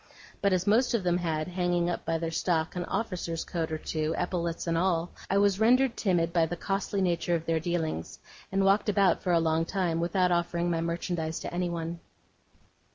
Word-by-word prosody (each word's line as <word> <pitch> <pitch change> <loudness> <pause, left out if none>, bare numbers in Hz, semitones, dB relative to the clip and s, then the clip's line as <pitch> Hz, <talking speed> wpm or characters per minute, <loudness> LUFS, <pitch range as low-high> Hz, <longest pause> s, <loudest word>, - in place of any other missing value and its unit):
But 200 - +3
as 185 -1 +1
most 235 +4 +3
of 215 - 0
them 175 0 +1
had, 155 -3 -1
hanging 175 -1 0
up 175 - -2
among 165 0 0
their 165 -1 -2
stock, 165 0 0
an 175 -1 -2
officer's 180 -5 -3
coat 165 -3 -3
or 155 - -1
two, 155 0 -2
epaulettes 170 -2 -2
and 165 -1 0
all, 170 -1 +1 0.2
I 195 - +2
was 200 -1 +3
rendered 245 +2 +4
timid 170 -4 +1
by 165 -2 +3
the 175 +2 -4
costly 195 +1 -1
nature 170 -1 +1
of 165 -1 -3
their 165 -1 +1
dealings, 160 - -3 0.3
and 195 0 +2
walked 200 +2 +3
about 200 -3 +3
for 185 - 0
a 170 - +4
long 160 0 +1
time 175 -2 -1
without 180 +1 +1
offering 175 0 0
my 165 -1 0
merchandise 170 -1 -2
to - - -6
anyone. 170 -1 -2
175 Hz, 200 wpm, -28 LUFS, 165-190 Hz, 0.3 s, rendered